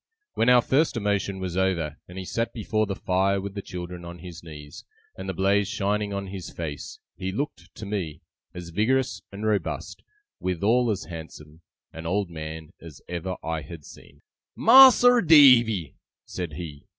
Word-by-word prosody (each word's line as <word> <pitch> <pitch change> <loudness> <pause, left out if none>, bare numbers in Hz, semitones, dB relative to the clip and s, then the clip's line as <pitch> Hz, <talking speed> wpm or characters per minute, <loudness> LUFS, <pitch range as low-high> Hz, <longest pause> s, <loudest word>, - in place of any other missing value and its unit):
When 115 - +2
our 125 -1 +6
first 140 0 +1
emotion 100 -2 -1
was 90 -2 -4
over, 85 -5 0
and 90 - -11
he 95 - -5
sat 115 +5 -2
before 110 -1 -1
the 100 - -3
fire 95 +2 +1
with 100 0 -6
the 100 - -5
children 90 -1 -7
on 85 0 -8
his 90 0 -10
knees, 75 -3 -11 0.3
and 95 0 -7
the - - -2
blaze 100 +2 +2
shining 100 +1 -1
on 100 0 -3
his 95 -2 -7
face, 75 -4 -7 0.2
he 95 0 -4
looked, 100 -6 -5
to 110 - -8
me, 90 -7 -4 0.3
as 90 -1 -8
vigorous 120 +9 0
and 100 +2 -6
robust, 105 -2 -2 0.4
withal 110 +7 +1
as 100 -5 -1
handsome, 80 -1 -10 0.3
an 80 0 -7
old 95 0 -1
man, 80 +1 -8
as 80 -5 -12
ever 90 +1 -4
I 80 -1 -3
had 80 -3 -11
seen. - - -16 0.3
'Mas'r 250 -2 +8
Davy,' 125 - +6 0.3
said 90 -4 -6
he. 75 -3 -8
95 Hz, 170 wpm, -25 LUFS, 85-105 Hz, 0.4 s, Mas'r